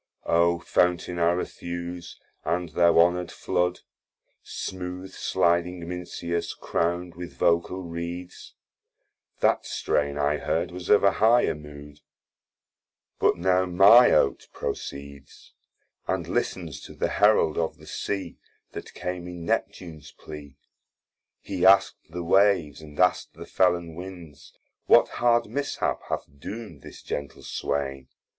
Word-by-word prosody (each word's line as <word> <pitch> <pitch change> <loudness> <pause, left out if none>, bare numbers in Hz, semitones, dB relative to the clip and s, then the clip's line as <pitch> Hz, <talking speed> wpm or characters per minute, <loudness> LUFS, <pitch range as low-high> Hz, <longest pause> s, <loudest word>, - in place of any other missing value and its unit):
O 85 +1 +3
Fountain 90 0 0
Arethuse, 85 0 -3 0.2
and 85 0 -1
thou 85 +2 +3
honour'd 90 +1 +3
floud, 90 0 -1 0.6
Smooth 90 0 -6
sliding 85 0 0
Mincius, 85 -1 -4
crown'd 85 +1 -2
with 85 +1 -9
vocall 85 +2 +1
reeds, 85 +1 -7 0.9
That - - +3
strain 70 -1 -1
I 75 +1 +1
heard 85 +4 -1
was 90 0 -8
of 105 - +5
a 100 - +6
higher 115 +5 +3
mood: 75 -1 -12 1.2
But - - +3
now 90 +1 +2
my 100 +7 +7
Oate - - +2
proceeds, 70 0 -7 0.5
And - - -1
listens 80 -5 -3
to - - -11
the - - 0
Herald 105 -7 +3
of 80 - -2
the - - -16
Sea 100 -2 -4 0.3
That - - -9
came 90 -1 -5
in 90 -1 -8
Neptune's 80 -4 -3
plea, 70 -3 -11 0.8
He 95 -2 -4
ask'd 95 -2 +4
the 90 +1 -5
Waves, 85 -5 +3
and 75 -1 -12
ask'd 90 0 +2
the - - -9
Fellon 85 -3 +1
winds, 85 -4 -10 0.4
What - - +6
hard 120 -1 +2
mishap 145 0 -2
hath - - -2
doom'd 100 -3 -8
this - - -12
gentle 70 -1 -6
swain? 70 -2 -3
85 Hz, 125 wpm, -26 LUFS, 80-90 Hz, 1.2 s, my